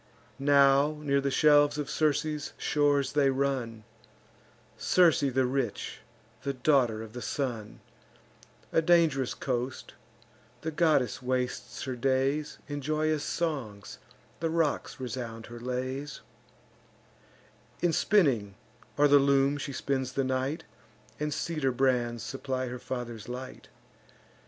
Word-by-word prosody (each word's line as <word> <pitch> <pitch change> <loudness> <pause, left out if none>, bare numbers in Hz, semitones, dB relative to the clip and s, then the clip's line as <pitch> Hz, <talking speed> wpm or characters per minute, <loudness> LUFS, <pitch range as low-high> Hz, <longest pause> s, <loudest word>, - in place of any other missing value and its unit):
Now 140 +1 +4
near 140 -2 +1
the 140 - 0
shelves 145 +1 +4
of 145 -2 -3
Circe's 150 0 0
shores 145 -2 +1
they 145 -2 +4
run, 130 -5 -1 0.9
(Circe 175 -4 +4
the 130 -2 +1
rich, 125 -4 -2 0.4
the 140 - -2
daughter 125 -5 +2
of 110 -1 -11
the 125 - -6
Sun,) 120 -7 -4 0.9
A 165 - +4
dang'rous 160 -6 +3
coast: 125 0 -3 0.7
the 160 - -3
goddess 150 -6 +2
wastes 125 0 -2
her 130 -1 -3
days 135 +4 0
In 145 0 -4
joyous 155 +1 0
songs; 130 -12 -3 0.4
the 165 - -1
rocks 160 -3 -1
resound 120 -2 -5
her 120 0 -10
lays: 130 +4 -4 1.6
In 175 -2 +3
spinning, 130 - +2 0.4
or 145 0 +6
the 145 0 +6
loom, 140 +1 +3
she 140 - -4
spends 130 -1 -2
the 135 - 0
night, 130 +4 -1 0.6
And 150 0 -1
cedar 155 -4 -1
brands 120 -3 +1
supply 130 -1 -3
her 125 0 -6
father's 120 -3 -6
light. 130 +1 -7
135 Hz, 120 wpm, -29 LUFS, 125-150 Hz, 1.6 s, or